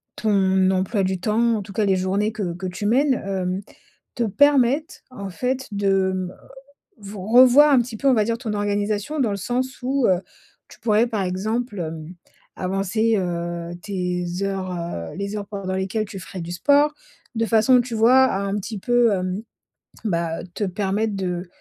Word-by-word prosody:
ton 190 -3 +2
emploi 190 +2 0
du 190 0 -1
temps, 225 +4 +2
en - - -3
tout 195 - -11
cas 210 +2 +1
les 195 -1 +3
journées 195 +3 0
que 200 -5 -3
que 185 +2 -7
tu 185 +3 -5
mènes, 265 +4 +3
heu, 190 -1 -2 0.5
te 240 - 0
permettent, 285 - +2
en 200 -5 -7
fait 255 +6 -2
de, 195 -2 +1
mmh, 185 -1 -3
heu, - - -15 0.7
ve 200 +1 -9
revoir 250 +8 +6
un 265 - +6
petit 235 -1 -6
peu 275 - -1
on - - +5
va 215 -2 +2
dire 230 +1 -1
ton 230 -3 -4
organisation? 205 +6 -1
Dans 230 -5 +1
le 200 - -2
sens 255 +7 -3
où, 260 +1 +1
heu, 185 -2 +3 0.5
tu - - -16
pourrais 220 +1 +3
par 220 -4 -2
exemple, 210 +4 -2
hem, 160 0 -6 0.4
avancer, 195 +4 0
heu, 170 -2 -3
tes 180 -3 -2 0.2
heures, 195 -1 -2
heu, 170 - -5
les 200 +1 -4
heures 200 -1 -5
pendant 195 -2 -4
lesquelles 190 +3 -1
tu 195 -1 -8
ferais 185 0 -8
du 170 +1 -6
sport? 285 - +3 0.4
De 225 0 +1
façon, 225 +3 +4
tu 240 -1 -5
vois, 250 +4 +6
à 195 -6 -1
un 200 0 -2
petit 205 +1 -5
peu, 240 +1 +3
hem, 185 +2 -2 0.6
bah, 170 -4 -1
te - - -2
permettre 200 +3 -1
de 180 -2 -3
200 Hz, 185 wpm, -22 LUFS, 185-230 Hz, 0.7 s, revoir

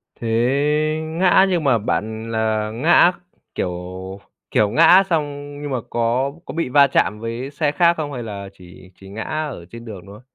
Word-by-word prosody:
Thế 115 - -6 0.8
ngã 175 +4 +3
nhưng 175 -4 0
mà 135 -5 +3
bạn 110 +1 -3
là 110 -1 -1
ngã, 160 +9 +4 0.4
kiểu, 90 - -2 0.8
kiểu, 105 - +3
ngã 165 - +6
xong 145 -3 -3
nhưng 145 -1 -5
mà 130 - 0
có 120 +4 0
có - - -7
bị 165 -5 -2
va 140 +2 +5
chạm 105 -5 0
với 115 +4 -5
xe 145 0 0
khác 170 +2 +3
không, 145 -2 -4
hay 125 -2 -5
là 100 -3 -7
chỉ 90 0 -16
chỉ 95 - -13
ngã 110 +3 -6
ở 150 - -4
trên 115 0 -10
đường 105 -5 -8
thôi? 100 +2 -12
125 Hz, 180 wpm, -20 LUFS, 110-150 Hz, 0.8 s, ngã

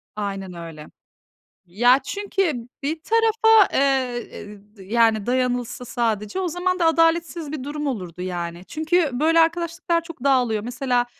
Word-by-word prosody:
Aynen 195 -3 -4
öyle. 165 -3 -9 0.8
Ya, 245 +9 +4
çünkü 375 - -2
bir 315 +3 -2
tarafa, 445 -1 +4
ııı, 265 -3 +1 0.6
y 190 +3 -11
yani, 225 -3 +3
dayanılsa 250 -1 -1
sadece, 225 - -2
o 365 - -1
zaman 365 +2 -1
da 335 - +2
adaletsiz 330 -1 +1
bir 275 -4 -5
durum 295 +1 -4
olurdu, 180 - -5
yani. 175 -1 -5
Çünkü 315 - 0
böyle 320 +6 +3
arkadaşlıklar 335 +1 0
çok 330 -6 -11
dağılıyor. 245 -6 +2
Mesela, 245 0 -1
265 Hz, 135 wpm, -22 LUFS, 220-330 Hz, 0.8 s, Ya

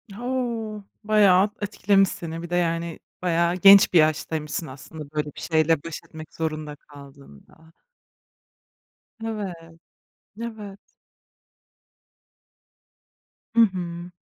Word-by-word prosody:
O! 235 -3 -3 0.2
Bayağı 205 -2 +4
etkilemiş 200 -2 +2
seni, 165 0 -6
bir 170 - -8
de 175 - -1
yani, 170 -1 -1 0.2
bayağı 170 0 +1
genç 195 +1 +7
bir 170 - +7
yaştaymışsın 155 0 0
aslında, 145 +2 -10
böyle 150 -1 -1
bir - - -9
şeyle 160 -2 +1
baş 165 -2 -6
etmek 155 -1 -11
zorunda 155 -2 -4
kaldığında. 140 - -17 1.5
Evet. 210 -5 -4 0.9
Evet. 210 -4 -7 2.8
Hı 230 - +6
hı. 175 -4 -1
170 Hz, 95 wpm, -24 LUFS, 155-200 Hz, 2.8 s, genç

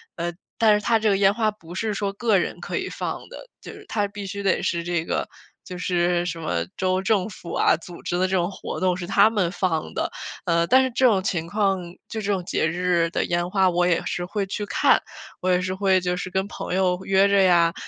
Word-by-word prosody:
呃， 175 0 -2 0.3
但 220 -2 +5
是 210 - +1
它 230 - +3
这 215 0 +2
个 195 - +3
烟 195 0 +4
花 220 -1 +1
不 175 -5 -12
是 215 +2 -1
说 200 -1 -2
个 215 -1 +2
人 - - -2
可 - - -4
以 - - -3
放 - - -5
的， - - -11
就 - - -9
是 420 0 -13
它 205 -2 0
必 200 0 -8
须 200 +1 -5
得 195 - +2
是 170 -1 -1
这 170 -1 -1
个， - - -2 0.4
就 180 - -8
是 175 -1 +1
什 165 -1 -4
么 85 - -2
州 185 0 +1
政 195 -1 +1
府 180 -4 -9
啊， - - +4
组 170 +1 -11
织 175 - -1
的 185 +1 +2
这 190 - -1
种 175 0 0
活 - - -6
动 185 -1 +2
是 175 -1 -6
他 205 - +5
们 200 -6 0
放 175 -5 -1
的。 - - -2 0.3
呃， 170 0 +2
但 260 +5 +5
是 260 - -1
这 255 +2 +2
种 205 -6 +4
情 170 -4 -2
况， 195 0 +1 0.3
就 220 - -4
这 205 0 -1
种 190 -2 -1
节 155 - 0
日 175 0 +1
的 - - -1
烟 175 0 -1
花， 190 -1 +3
我 175 0 +2
也 170 -2 +1
是 175 - -2
会 200 +2 -2
去 205 +2 -4
看， - - +3 0.4
我 185 - 0
也 180 - +3
是 185 0 -2
会 190 -1 +2
就 180 0 -1
是 185 - -4
跟 190 +2 -1
朋 200 - -6
友 180 -1 +1
约 195 +1 +4
着 200 0 +4
呀， 170 -3 +4
185 Hz, 265 characters per minute, -24 LUFS, 175-200 Hz, 0.4 s, 但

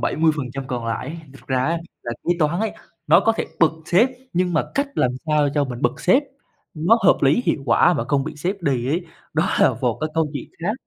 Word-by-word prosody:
70% 145 -5 0
còn 120 -2 -4
lại 115 +2 -3
ấy, 160 - -6 0.2
thật - - -16
ra 130 -1 0
ấy, 165 +2 0 0.2
là 120 - -4
kế - - 0
toán 165 +4 +1
ấy, 220 - -1 0.3
nó - - +6
có 225 - +3
thể - - -1 0.2
bật 160 -2 +5
sếp, 205 +9 +4 0.2
nhưng 180 0 +1
mà 150 - +2
cách 280 +1 +1
làm 125 - +2 0.2
sao 150 -2 +2
cho 145 -1 +2
mình 125 +1 -7
bật - - 0
sếp 255 +11 +4 0.5
nó 175 +10 +3
hợp - - +6
lý, 140 - +4
hiệu 135 - +1
quả 130 +9 +4
mà 145 - -1
không 140 -2 +1
bị 160 - -6
sếp 180 +5 -3
đì 130 -4 0
ấy, 170 +4 -1 0.3
đó - - +1
là - - +5
một - - 0
cái 155 - -1
câu 160 -1 +2
chuyện 135 - -6
khác. 205 - +1
155 Hz, 235 wpm, -22 LUFS, 135-175 Hz, 0.5 s, nó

